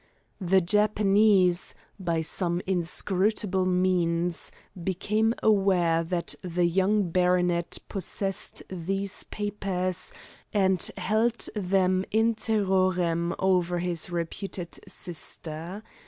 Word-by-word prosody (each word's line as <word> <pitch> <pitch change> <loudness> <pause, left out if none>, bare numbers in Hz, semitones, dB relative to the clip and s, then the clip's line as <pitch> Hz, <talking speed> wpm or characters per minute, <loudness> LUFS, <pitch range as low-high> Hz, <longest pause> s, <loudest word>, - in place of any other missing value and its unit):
The 190 +1 +3
Japanese, 200 -1 +3 0.2
by 170 -3 0
some 175 +2 0
inscrutable 190 +2 +1
means, 180 -2 0 0.3
became 215 +5 0
aware 185 -6 +3
that 170 +1 -2
the 180 -1 0
young 190 +2 +2
baronet 180 -1 +1
possessed 195 +1 -2
these 195 +2 -2
papers, 190 -3 -2 0.4
and 190 -3 +2 0.2
held 220 +5 +1
them 185 -2 +1
in 225 +2 +2
terrorem 185 -6 +1
over 180 -2 +1
his 175 -1 0
reputed 175 +1 -5
sister. 170 +2 -5
185 Hz, 90 wpm, -27 LUFS, 175-200 Hz, 0.4 s, The